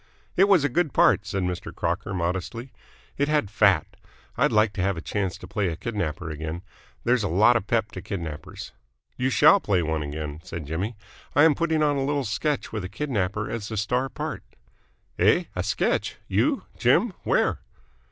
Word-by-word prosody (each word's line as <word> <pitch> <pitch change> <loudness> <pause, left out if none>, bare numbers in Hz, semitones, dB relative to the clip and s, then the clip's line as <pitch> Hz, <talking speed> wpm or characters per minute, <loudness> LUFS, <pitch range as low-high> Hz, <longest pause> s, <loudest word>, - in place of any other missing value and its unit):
"It 195 - +6
was 195 -7 +4
a - - +3
good 155 +1 0
part," 100 - +4
said 95 -1 -2
Mr. 90 -1 -3
Crocker - - -2
modestly. 95 +8 -3 0.5
"It 145 - +2
had 150 -10 +1
fat. 100 -6 +4 0.5
I'd - - +2
like 105 -1 +3
to 95 - -3
have 95 -1 0
a - - -2
chance 95 +2 -2
to - - -11
play 105 -3 -1
a 85 - -2
kidnapper 85 -6 -3
again. 80 +3 -5 0.4
There's 120 0 +2
a 100 - 0
lot 105 +8 +5
of 110 -4 -1
pep 110 -2 0
to 95 - -7
kidnappers." 85 -6 -6 0.4
"You 125 +1 0
shall 200 +9 +6
play 95 - +1
one 80 0 -1
again," 75 0 -5
said 85 -3 -7
Jimmy. 90 +10 -3 0.4
"I 145 - +6
am 160 -1 +6
putting 160 -1 +1
on 145 -1 +2
a 135 - 0
little 140 0 0
sketch 145 +7 -1
with 105 -3 -4
a 90 - -5
kidnapper 105 -5 -2
as 110 -3 -4
the 110 - -5
star 125 +6 0
part." - - -5 0.8
"Eh? 105 - +4
A 90 - -1
sketch? 95 +2 0
You, - - +1 0.2
Jim? - - +3
Where?" - - +1
105 Hz, 190 wpm, -25 LUFS, 90-125 Hz, 0.8 s, It